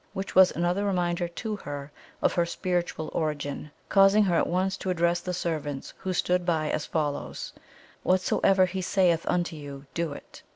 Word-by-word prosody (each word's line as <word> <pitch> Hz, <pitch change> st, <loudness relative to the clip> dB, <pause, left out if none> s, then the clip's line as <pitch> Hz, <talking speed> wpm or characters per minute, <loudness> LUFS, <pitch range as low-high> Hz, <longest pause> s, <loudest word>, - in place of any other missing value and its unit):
which 195 Hz, +1 st, -4 dB
was 190 Hz, -1 st, +8 dB
another 175 Hz, +4 st, 0 dB
reminder 175 Hz, -3 st, 0 dB
to 215 Hz, +5 st, -4 dB
her 145 Hz, -4 st, -7 dB, 0.3 s
of -, -, +3 dB
her 175 Hz, -, +2 dB
spiritual 170 Hz, -2 st, -2 dB
origin, 150 Hz, -2 st, -2 dB, 0.2 s
causing 195 Hz, +2 st, +6 dB
her 185 Hz, -3 st, +1 dB
at -, -, +2 dB
once 185 Hz, +2 st, 0 dB
to 190 Hz, -, -5 dB
address 170 Hz, -1 st, +2 dB
the 180 Hz, -, -4 dB
servants 155 Hz, -6 st, -3 dB
who 190 Hz, -, -4 dB
stood 180 Hz, 0 st, +1 dB
by 160 Hz, -3 st, 0 dB
as 150 Hz, -, -2 dB
follows: 150 Hz, -3 st, -3 dB, 0.5 s
'Whatsoever 185 Hz, +1 st, +3 dB
He 185 Hz, +1 st, -3 dB
saith 180 Hz, -3 st, +2 dB
unto 175 Hz, -2 st, 0 dB
you, 140 Hz, -2 st, -9 dB
do 170 Hz, -2 st, -1 dB
it.' -, -, -12 dB
175 Hz, 170 wpm, -27 LUFS, 155-185 Hz, 0.5 s, was